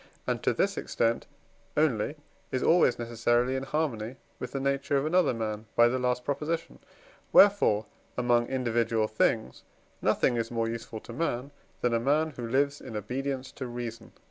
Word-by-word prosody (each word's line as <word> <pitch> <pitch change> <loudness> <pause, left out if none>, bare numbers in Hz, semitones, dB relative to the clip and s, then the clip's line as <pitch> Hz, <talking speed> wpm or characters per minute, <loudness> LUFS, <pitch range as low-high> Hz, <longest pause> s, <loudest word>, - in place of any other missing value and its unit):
and - - -1
to - - +2
this - - 0
extent 115 0 0 0.5
only 145 -3 +2 0.4
is 130 - -1
always 165 -7 +4
necessarily 120 +2 +1
in 130 - -1
harmony 135 -5 -2 0.2
with 125 - -5
the 135 - -2
nature 140 +1 0
of 135 - 0
another 180 +3 +3
man 110 -2 -4
(by 120 - +7
the 130 +2 0
last 125 0 0
Prop.); 140 0 -1 0.9
wherefore 195 - +6 0.3
among 120 -1 +2
individual 115 -4 +1
things 110 - 0 0.4
nothing 120 - +2
is 115 -1 -1
more 115 -1 -1
useful 115 -1 -5
to 115 - -10
man, 135 -1 -2 0.3
than 120 -1 +1
a 115 - +3
man 150 +6 +2
who 120 -4 -6
lives 140 +4 +1
in 115 -4 -6
obedience 130 +5 -3
to 130 - -6
reason. 120 -1 -6
125 Hz, 165 wpm, -29 LUFS, 115-140 Hz, 0.9 s, by